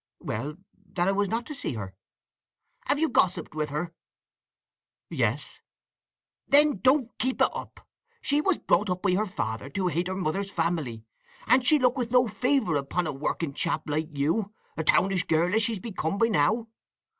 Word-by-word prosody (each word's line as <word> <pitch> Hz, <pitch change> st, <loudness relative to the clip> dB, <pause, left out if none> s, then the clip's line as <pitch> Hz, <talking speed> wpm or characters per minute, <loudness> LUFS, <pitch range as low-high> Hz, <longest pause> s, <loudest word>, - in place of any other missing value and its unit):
"Well—that 175 Hz, -, -5 dB
I -, -, +4 dB
was 200 Hz, +1 st, +1 dB
not 230 Hz, +1 st, -1 dB
to 305 Hz, -, -7 dB
see 275 Hz, -, -4 dB
her." 100 Hz, -3 st, -6 dB, 0.9 s
"Have -, -, +2 dB
you 320 Hz, +2 st, +2 dB
gossiped 185 Hz, -, +1 dB
with 150 Hz, -1 st, -2 dB
her?" 160 Hz, +4 st, -3 dB, 1.2 s
"Yes." -, -, -1 dB, 0.9 s
"Then 290 Hz, -6 st, +5 dB
don't 255 Hz, +3 st, +2 dB
keep 260 Hz, 0 st, 0 dB
it -, -, +5 dB
up. -, -, -9 dB, 0.3 s
She 290 Hz, -6 st, +1 dB
was 380 Hz, +2 st, +2 dB
brought 210 Hz, -, +1 dB
up 180 Hz, 0 st, -2 dB
by 195 Hz, -, +3 dB
her 210 Hz, +4 st, +1 dB
father 130 Hz, -, -4 dB
to 185 Hz, +5 st, -1 dB
hate 175 Hz, +1 st, -1 dB
her 185 Hz, -, -3 dB
mother's 190 Hz, +2 st, -2 dB
family; 165 Hz, -, -2 dB, 0.4 s
and 255 Hz, 0 st, +4 dB
she'll 285 Hz, +1 st, +5 dB
look 250 Hz, +1 st, +3 dB
with 240 Hz, -2 st, -1 dB
no 250 Hz, 0 st, +4 dB
favour 250 Hz, -, +1 dB
upon 140 Hz, +6 st, -1 dB
a 155 Hz, -, -2 dB
working 145 Hz, +2 st, -2 dB
chap 155 Hz, +2 st, -1 dB
like 155 Hz, +2 st, -1 dB
you—a 165 Hz, +3 st, -2 dB
townish 185 Hz, +2 st, +3 dB
girl 165 Hz, +3 st, +2 dB
as 220 Hz, -, +3 dB
she's 220 Hz, -1 st, 0 dB
become 190 Hz, -4 st, -3 dB
by 230 Hz, +2 st, +3 dB
now. 215 Hz, +6 st, +2 dB
190 Hz, 170 wpm, -27 LUFS, 155-230 Hz, 1.2 s, Then